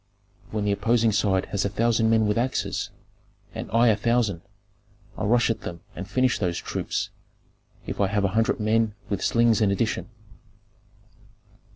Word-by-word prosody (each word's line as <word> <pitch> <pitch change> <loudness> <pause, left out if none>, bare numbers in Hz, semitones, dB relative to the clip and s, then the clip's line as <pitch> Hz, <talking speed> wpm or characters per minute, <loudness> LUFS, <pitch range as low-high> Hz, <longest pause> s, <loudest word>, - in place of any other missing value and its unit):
When 105 -1 -2
the 100 - +2
opposing 115 +3 +2
side 100 -2 +1
has 100 -1 0
a 100 - 0
thousand 115 +2 +2
men 110 -1 +3
with 105 0 +1
axes, 125 +3 -1 0.6
and - - -6
I 115 +1 +4
a 110 - +4
thousand, 110 -5 0 0.7
I 110 - -3
rush 120 +2 +3
at 115 - -4
them 85 -1 -7
and 95 +2 -7
finish 130 +3 +1
those 90 -3 -1
troops, - - -3 0.7
if - - -4
I 100 - +3
have 100 +1 0
a - - +2
hundred 115 +1 +1
men 110 0 +1
with 100 - -2
slings 115 -1 +3
in 105 - +4
addition. 110 +4 -1
110 Hz, 165 wpm, -25 LUFS, 100-115 Hz, 0.7 s, I